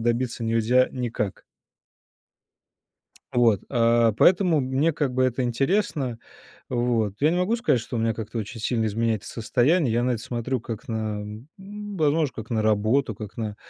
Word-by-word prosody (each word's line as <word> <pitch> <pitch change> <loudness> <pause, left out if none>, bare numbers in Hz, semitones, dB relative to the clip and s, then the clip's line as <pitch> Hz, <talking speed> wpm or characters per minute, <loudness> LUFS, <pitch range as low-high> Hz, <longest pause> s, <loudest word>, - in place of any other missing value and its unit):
добиться 120 +1 -1
нельзя 115 +3 +3
никак. 120 -6 -3 1.9
Вот, 115 -5 +3
э, 115 -2 +3
поэтому 175 - +4
мне 135 +5 +1
как 145 -4 -1
бы 130 - +1
это 130 0 0
интересно. 135 - 0 0.5
Вот, 120 -4 0
я 150 +2 +4
не 175 - 0
могу 185 +6 +1
сказать, 230 - +1
что 120 +2 -6
у - - 0
меня 115 0 +1
как-то 110 +1 -5
очень 110 +2 -6
сильно 110 0 0
изменяется 110 0 -1
состояние. 125 +5 +2
Я 120 +1 +1
на 125 0 +1
это 115 - -3
смотрю 120 +2 -3
как 115 +2 -7
на, 110 -2 -2
м, 105 +4 -9 0.5
возможно, 150 -3 +2
как 110 0 -8
на 110 -2 0
работу, 110 +4 +2
как 105 0 -9
на 105 -2 -4
120 Hz, 160 wpm, -25 LUFS, 110-130 Hz, 1.9 s, поэтому